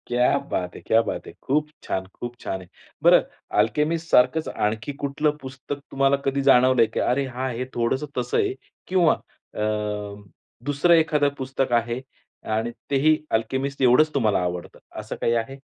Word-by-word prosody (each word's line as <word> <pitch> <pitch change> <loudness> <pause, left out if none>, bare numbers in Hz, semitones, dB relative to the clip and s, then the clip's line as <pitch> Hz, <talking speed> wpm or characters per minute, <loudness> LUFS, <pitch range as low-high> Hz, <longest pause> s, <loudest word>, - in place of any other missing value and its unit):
क्या 125 +3 +3
बात 90 -1 -2
है! - - -9
क्या 115 - +3
बात 115 - -5
है! - - -8
खूप 150 +3 +1 0.2
छान, 95 0 -2
खूप 120 0 -5
छान 95 - -4
आहे. 90 - -13 0.4
बरं, - - +7 0.4
अल्केमिस्ट 150 +10 +1
सारखंच 130 +6 +4
आणखी 110 +6 -2
कुठलं 150 +2 0
पुस्तक 135 +2 -7
तुम्हाला 135 0 +3
कधी 140 0 +1
जाणवलं, 130 -2 +5
की - - -1
"अरे 135 +2 +1
हां! 130 0 -4
आहे, 125 0 -3
थोडंसं 130 +5 0
तसं 455 - 0
आहे." 400 -3 +1 0.3
किंवा 180 -4 +4 0.4
अ, - - -3 1.0
दुसरं 145 +5 +3
एखादं 150 -3 +3
पुस्तक 135 -1 -2
आहे 120 +1 +1 0.5
आणि 115 +2 -1 0.2
तेही 145 +3 +4 0.2
अल्केमिस्ट 135 +5 -3
एवढंच 135 +5 +5
तुम्हाला 110 -8 +2
आवडतं, 90 -1 -5 0.2
असं - - -6
काही 115 - +2
आहे? 120 +4 -2
130 Hz, 160 wpm, -24 LUFS, 120-145 Hz, 1.0 s, बरं